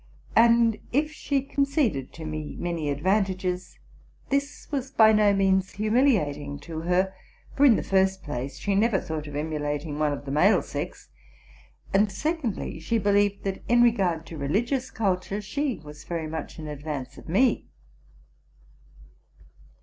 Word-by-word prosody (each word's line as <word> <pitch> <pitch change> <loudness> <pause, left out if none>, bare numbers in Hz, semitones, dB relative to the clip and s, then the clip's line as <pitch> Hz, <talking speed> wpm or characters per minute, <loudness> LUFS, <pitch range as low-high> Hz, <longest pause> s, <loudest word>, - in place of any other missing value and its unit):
And, 230 -1 +5
if 300 +4 +1
she 280 -3 -1
conceded 275 - 0
to 160 - -8
me 155 -1 -5
many 170 -4 -2
advantages, 185 +3 -1 0.5
this 280 +1 -2
was 270 -2 -2
by 220 -3 +6
no 210 -1 +5
means 190 -1 +2
humiliating 205 - +1
to 160 0 -6
her: 180 +3 +1 0.4
for, 285 +1 +6
in 235 - +7
the - - -1
first 190 0 +1
place, 135 -2 -5
she 200 +7 -1
never 205 0 +3
thought 155 -2 -5
of 145 - -8
emulating 150 0 -3
one 150 -1 +2
of 145 0 -5
the 135 - -5
male 150 - +4
sex; - - -6 0.8
and, 200 +1 +3
secondly, 295 - -2
she 230 - 0
believed, 205 -1 +2
that, 195 -1 -3
in 240 0 +6
regard 185 -9 +2
to 160 -1 -8
religious 235 - 0
culture, 195 -1 -1
she 270 +5 -2
was 150 0 -12
very 165 -2 -3
much 155 -1 -6
in 155 - -7
advance 145 -2 -6
of - - -13
me. 240 +9 +2
190 Hz, 150 wpm, -26 LUFS, 155-230 Hz, 0.8 s, in